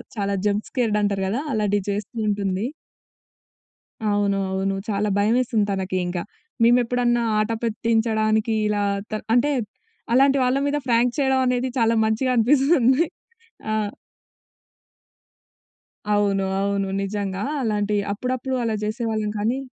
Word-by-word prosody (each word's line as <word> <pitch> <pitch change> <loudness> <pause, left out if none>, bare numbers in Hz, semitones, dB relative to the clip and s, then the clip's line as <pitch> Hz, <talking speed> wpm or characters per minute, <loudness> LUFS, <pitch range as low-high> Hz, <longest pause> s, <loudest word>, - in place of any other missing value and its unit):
చాలా 200 -1 -1
jump 205 +1 -1
scared 230 -5 +1
అంటారు 200 -1 0
కదా! 245 +7 -1
అలాటియి 205 -2 0
చేస్తూ 205 +4 -5
ఉంటుంది. 200 0 -1 1.5
అవును. 200 -1 +1
అవును. 195 0 -1
చాలా 210 0 0
భయమేసింది. 225 0 +2
తనకి 190 -1 -2
ఇంక. 175 0 -3 0.4
మేమెప్పుడన్నా 240 0 +3 0.2
ఆటపెట్టించడానికి 220 0 0
ఇలా 205 -1 0 0.3
త - - -17 0.2
అంటే 270 +5 +3 0.6
అలాంటి 270 +2 +5
వాళ్ళ 250 +2 +2
మీద 290 +1 0
ఫ్రాంక్ 240 0 +3
చేయడం 265 -1 +2
అనేది 250 +1 +1
చాలా 230 0 +3
మంచిగా 220 +4 +1
అనిపిస్తుంది. 270 +3 +4 0.7
ఆ! - - 0 2.4
అవును. 200 -2 +2 0.2
అవును. 200 -1 0
నిజంగా 195 -1 -3 0.2
అలాంటియి 210 -2 0
అప్పుడప్పుడు 255 +4 -2
అలా 225 -1 0
జేసేవాళ్ళం 215 -1 -2
కానీ 230 +6 0
220 Hz, 115 wpm, -23 LUFS, 205-245 Hz, 2.4 s, అలాంటి